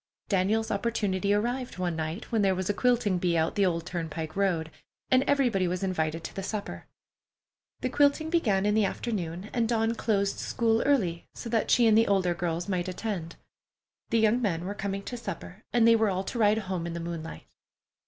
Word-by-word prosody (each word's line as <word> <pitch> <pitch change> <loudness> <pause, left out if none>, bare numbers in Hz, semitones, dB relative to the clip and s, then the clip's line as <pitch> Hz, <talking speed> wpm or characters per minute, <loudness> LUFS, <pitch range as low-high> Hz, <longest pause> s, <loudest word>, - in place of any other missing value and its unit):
Daniel's 205 +3 +1
opportunity 200 -2 0
arrived 240 +4 -1
one 180 -2 -1
night 160 +5 -4
when 225 -2 +2
there 195 -2 +3
was 185 +2 -1
a - - -3
quilting 230 -5 +2
bee 175 -1 +1
out 160 0 +1
the 200 -2 +3
old 170 -2 -1
turnpike 160 -3 -4
road, 175 -5 0 0.4
and 255 0 +6
everybody 245 -10 +2
was 180 +2 -2
invited 165 -3 -1
to - - -6
the 195 - -3
supper. 200 +1 -5 0.9
The 255 - -1
quilting 290 +4 +2
began 210 - +2
in 210 - +2
the 215 0 +3
afternoon, 190 -3 -3
and 230 -2 +1
Dawn 225 -1 +1
closed 200 -3 0
school 230 -2 +1
early, 185 -13 +1
so 235 - -6
that 225 -2 0
she 240 - +5
and 220 -1 +5
the 225 +1 +5
older 190 -3 +2
girls 170 0 -2
might 185 -3 -1
attend. 180 -3 -4 0.7
The 230 - +2
young 225 +2 +3
men 175 -6 -1
were 200 - -3
coming 200 -1 -4
to 245 - -5
supper, 200 -2 -7
and 235 -1 +4
they 230 - +7
were 220 -2 +2
all 190 0 -1
to 235 +5 -5
ride 210 0 +4
home 185 -5 -3
in 170 - -4
the 170 - -4
moonlight. 165 - -6
200 Hz, 200 wpm, -28 LUFS, 175-225 Hz, 0.9 s, they